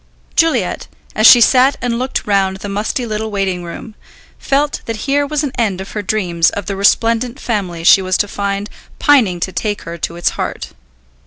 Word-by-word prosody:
Juliet, 330 -1 +1 0.3
as 215 +1 +6
she 245 - +9
sat 260 +3 +4
and 240 -1 -2
looked 255 +1 -3
round 195 -2 +1
the 200 - -7
musty 210 +5 -2
little 220 0 -3
waiting 195 -3 -2
room, 175 +6 -9 0.5
felt 285 +1 0
that 230 - -3
here 285 +1 +1
was 300 0 -1
an 285 - -2
end 200 -5 0
of 190 - -8
her 210 - -3
dreams 180 -5 +1
of 205 - -6
the 200 +1 -3
resplendent 230 +5 +1
family 185 -10 -3
she 190 - +6
was 185 0 0
to 205 - 0
find 200 +1 -3 0.3
pining 235 - +3
to 190 - -2
take 205 +1 -3
her 170 0 -8
to 165 - -4
its 175 - 0
heart. - - -5
210 Hz, 190 wpm, -16 LUFS, 190-245 Hz, 0.5 s, she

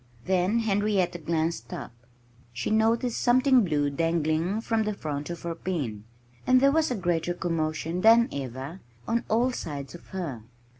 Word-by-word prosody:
Then 190 +5 +2
Henrietta 200 -4 +1
glanced 160 -5 -2
up. - - -6 0.6
She 120 - -3
noticed 225 +2 +2
something 255 0 +5
blue 145 -5 0
dangling 165 +5 0
from 225 -1 0
the 210 -1 -1
front 150 -4 -4
of 170 -1 -6
her 170 -1 -2
pen. 140 - -4 0.4
And 255 0 +6
there 275 +1 +5
was 315 +1 +2
a 250 - -1
greater 175 -2 -1
commotion 165 0 -2
than 230 +2 +6
ever 135 +5 -6 0.3
on 230 +1 0
all 240 +4 +2
sides 140 - -6
of 175 - -12
her. 165 -11 -5
175 Hz, 155 wpm, -27 LUFS, 155-225 Hz, 0.6 s, And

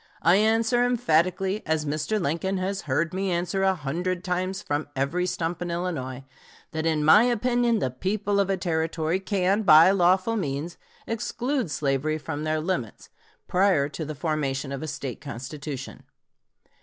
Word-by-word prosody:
I 170 +5 +5
answer 225 +3 +3
emphatically, 190 -4 +1
as 160 -1 0
Mr. 155 +9 -1
Lincoln 180 +4 -1
has 190 +1 -2
heard 155 +6 0
me 190 +1 -1
answer 180 +2 -1
a 190 0 +3
hundred 175 +4 -3
times 185 +1 -2
from 145 +1 -2
every 160 +7 0
stump 170 -1 -3
in 175 - -3
Illinois, 150 -7 -3 0.5
that 160 0 -2
in 155 -2 +1
my 185 +9 +7
opinion 240 0 +2
the 130 - -1
people 200 +8 -1
of 195 -1 +1
a 195 - +1
Territory 160 0 -1
can, 195 +1 +1
by 165 -2 +7
lawful 185 +3 +3
means, 150 -1 -3 0.3
exclude 240 - -2
slavery 145 +1 0
from 155 -1 -5
their 155 0 0
limits, 155 - -4 0.4
prior 180 -6 +3
to 160 - -5
the 155 0 -5
formation 140 -3 -2
of 140 - -4
a 155 - -4
State 135 -4 -5
constitution. 140 0 -7
175 Hz, 155 wpm, -25 LUFS, 150-195 Hz, 0.5 s, my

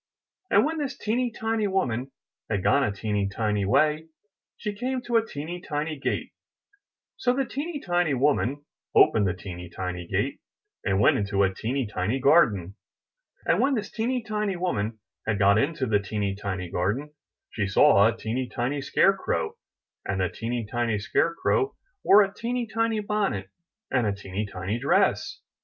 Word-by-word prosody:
And - - +5
when 320 +1 -2
this 280 -2 -3
teeny 240 +3 0
tiny 225 -1 -1
woman 135 - -1 0.4
had 100 -4 -1
gone 140 - +4
a 105 - +1
teeny 100 -1 -1
tiny 105 -1 0
way, 155 +9 +2 0.5
she 210 -2 -3
came 255 +5 -2
to 240 -1 -2
a 225 - +3
teeny 175 -2 -6
tiny 155 0 -3
gate; - - -2 0.9
so 245 - +2
the 270 0 +1
teeny 290 +5 -4
tiny 175 - +1
woman 145 +1 +1 0.3
opened 105 -3 +5
the 90 - -1
teeny 90 -2 -8
tiny 90 -1 -5
gate, - - -1 0.4
and 95 0 +1
went 105 - +5
into 100 -1 +1
a 95 -1 +2
teeny 125 +6 -2
tiny 105 +4 -1
garden. 110 - +3 0.7
And - - +3
when 275 0 +3
this 210 -3 -3
teeny 240 +2 -1
tiny 210 -2 -1
woman 115 - -2 0.3
had 110 -2 +1
got 100 +1 +5
into 140 +1 0
the 105 -4 +2
teeny 100 0 -2
tiny 95 -3 -4
garden, 105 +12 -1 0.4
she 105 -3 -1
saw 100 +1 +6
a 115 0 -1
teeny 120 +3 -3
tiny 135 +4 -2
scare 195 +7 +4
crow, 80 - -2 0.5
and 95 0 -2
the 90 -1 +1
teeny 115 +5 -3
tiny 115 0 -1
scare 165 +10 +1
crow 415 - +1 0.3
wore 205 +1 +7
a 195 0 -4
teeny 240 +3 -2
tiny 225 0 0
bonnet 200 - -1 0.4
and 125 -4 +2
a 100 - +1
teeny 100 +1 -4
tiny 100 +3 -3
dress. 140 - +1
125 Hz, 170 wpm, -26 LUFS, -, 0.9 s, wore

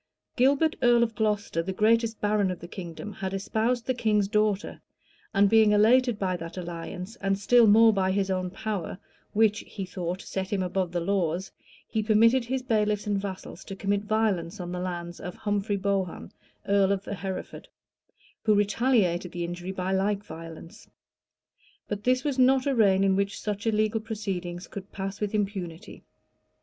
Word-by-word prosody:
Gilbert, 280 +5 +3
earl 240 -1 +5
of 230 -1 -1
Glocester, 210 -5 0
the 185 +3 -4
greatest 225 +3 +2
baron 205 -2 +1
of 180 - -4
the 170 - -9
kingdom, 175 +3 -7
had 190 0 -4
espoused 225 +4 -1
the 255 - +1
king's 215 -4 +1
daughter; 210 -1 0 0.5
and 200 +1 +4
being 220 0 +5
elated 235 +3 +4
by 185 -3 -1
that 165 +1 -7
alliance, 180 +4 -6
and 195 0 0
still 235 +3 +5
more 220 +2 +7
by 190 -2 +1
his 195 0 0
own 185 -1 -1
power, 195 -2 -4 0.4
which, 215 0 +3
he 195 -3 -7
thought, 180 -1 -4
set 190 -1 -5
him 195 -2 0
above 185 -1 -1
the 175 - -1
laws, 180 0 -1 0.4
he 220 - -1
permitted 230 +4 +4
his 260 +1 -2
bailiffs 210 -4 +1
and 205 -1 0
vassals 190 -2 -7
to 195 - -7
commit 200 +1 0
violence 210 -4 0
on 175 -1 -5
the 180 - -3
lands 175 -1 -5
of 180 0 -7
Humphrey 205 -1 -1
Bohun, 195 -3 -2 0.4
earl 200 -1 +3
of 200 0 -1
Hereford, 195 -1 -6 0.7
who 215 -2 +3
retaliated 205 -4 +2
the 175 -1 -3
injury 175 +2 -5
by 185 0 -3
like 195 +1 0
violence. 165 +1 -10 1.0
But 205 0 -5
this 255 +1 +2
was 280 -3 -1
not 260 +1 +4
a 280 - +1
reign 195 -5 +4
in 195 -1 +3
which 200 +1 -1
such 205 +1 -3
illegal 215 0 +1
proceedings 190 -5 -5
could 200 -1 -9
pass 195 +1 -5
with 210 0 -1
impunity. 195 -3 -4
200 Hz, 170 wpm, -27 LUFS, 185-220 Hz, 1.0 s, more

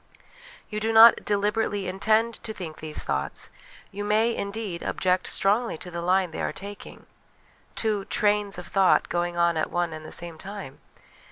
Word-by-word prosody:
You 210 - -2
do 220 +1 0
not 225 +1 +8
deliberately 205 -1 0
intend 215 +4 +1
to 220 - -4
think 165 -4 -7
these 155 -1 -4
thoughts; - - -3 0.4
you 205 +1 -5
may, 220 +3 +2
indeed, 200 -3 -4
object 185 0 0
strongly 210 0 +1
to 180 - -8
the 170 0 -4
line 180 0 +2
they - - -5
are - - -1
taking 200 +1 -9 0.7
(two 210 -3 -1
'trains' 205 -2 +1
of 180 - -7
thought 195 0 +3
going 175 0 -1
on 170 -1 +2
at 155 - 0
one 175 -2 -1
and 155 0 -8
the - - -10
same 170 -2 -2
time 195 -8 -8
195 Hz, 170 wpm, -26 LUFS, 175-210 Hz, 0.7 s, not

